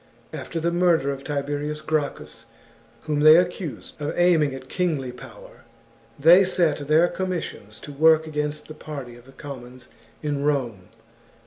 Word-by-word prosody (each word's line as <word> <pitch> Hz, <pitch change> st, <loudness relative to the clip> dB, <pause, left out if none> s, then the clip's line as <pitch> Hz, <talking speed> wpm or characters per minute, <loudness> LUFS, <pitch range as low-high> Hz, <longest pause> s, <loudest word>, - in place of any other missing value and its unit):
After 170 Hz, -, -5 dB
the 170 Hz, +1 st, 0 dB
murder 170 Hz, -5 st, +2 dB
of 135 Hz, 0 st, -7 dB
Tiberius 145 Hz, +1 st, -3 dB
Gracchus, 155 Hz, -2 st, -3 dB, 0.6 s
whom 150 Hz, -1 st, -1 dB
they 155 Hz, +1 st, +8 dB
accused 175 Hz, -3 st, -2 dB
of 145 Hz, -, -3 dB
aiming 165 Hz, -6 st, +3 dB
at 130 Hz, 0 st, -10 dB
kingly 155 Hz, -9 st, -2 dB
power, 125 Hz, -4 st, -14 dB, 0.6 s
they 170 Hz, +6 st, +7 dB
set 165 Hz, -6 st, 0 dB
their 160 Hz, +3 st, +4 dB
com 185 Hz, +1 st, -3 dB
missions 110 Hz, -, -6 dB
to 145 Hz, -, -9 dB
work 160 Hz, +2 st, +4 dB
against 150 Hz, -1 st, -4 dB
the 155 Hz, -, -9 dB
party 140 Hz, -6 st, -8 dB
of 120 Hz, 0 st, -17 dB
the 135 Hz, -, -16 dB
commons 130 Hz, -3 st, -10 dB, 0.3 s
in 145 Hz, -2 st, -2 dB
Rome. 125 Hz, -10 st, -1 dB
150 Hz, 150 wpm, -24 LUFS, 135-160 Hz, 0.6 s, they